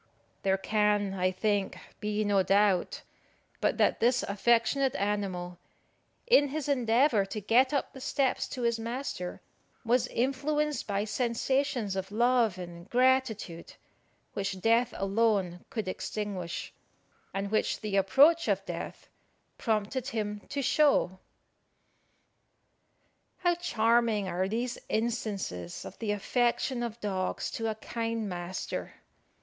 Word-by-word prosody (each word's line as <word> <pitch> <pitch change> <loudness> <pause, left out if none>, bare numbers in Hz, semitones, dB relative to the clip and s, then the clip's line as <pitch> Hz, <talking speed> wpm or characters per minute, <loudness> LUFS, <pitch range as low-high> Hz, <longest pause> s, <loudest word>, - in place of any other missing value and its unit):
There 190 0 +2
can, 210 0 +1
I 185 -1 +1
think, 200 +1 -1 0.2
be 210 0 -1
no 205 -2 +3
doubt 195 -1 +2 0.6
but - - +1
that - - +3
this 245 +2 +3
affectionate 235 +6 +2
animal, 190 -4 -2 0.7
in 475 -12 +5
his 295 +1 -4
endeavour 245 -3 +3
to 215 - -4
get 235 +6 +3
up 285 -2 -1
the 265 - -10
steps 265 0 0
to 250 - -5
his 235 -1 +1
master, 230 -6 -4 0.4
was 240 +1 +2
influenced 290 +4 -1
by 200 -1 0
sensations 245 -1 0
of 190 0 -4
love 235 -3 +3
and 175 0 -9
gratitude, 250 -9 +1 0.6
which 195 -1 -3
death 230 +4 +3
alone 195 -3 +1
could 220 -5 -4
extinguish, 185 -2 -4 0.6
and 195 +1 -3
which 215 - +1
the 210 -2 -2
approach 285 - +5
of - - 0
death - - -6 0.5
prompted 225 +3 -1
him 210 -5 -3
to 280 0 -2
show. 265 - +3 2.2
How 350 -1 +2
charming 230 - +2
are 185 +1 -1
these 235 +4 -2
instances 210 - -2
of - - -10
the 220 -3 -1
affection 240 +4 0
of 235 -1 -4
dogs 190 -3 -2
to 225 - -3
a 215 - -2
kind 225 0 -3
master! 180 0 -5
220 Hz, 120 wpm, -29 LUFS, 195-250 Hz, 2.2 s, in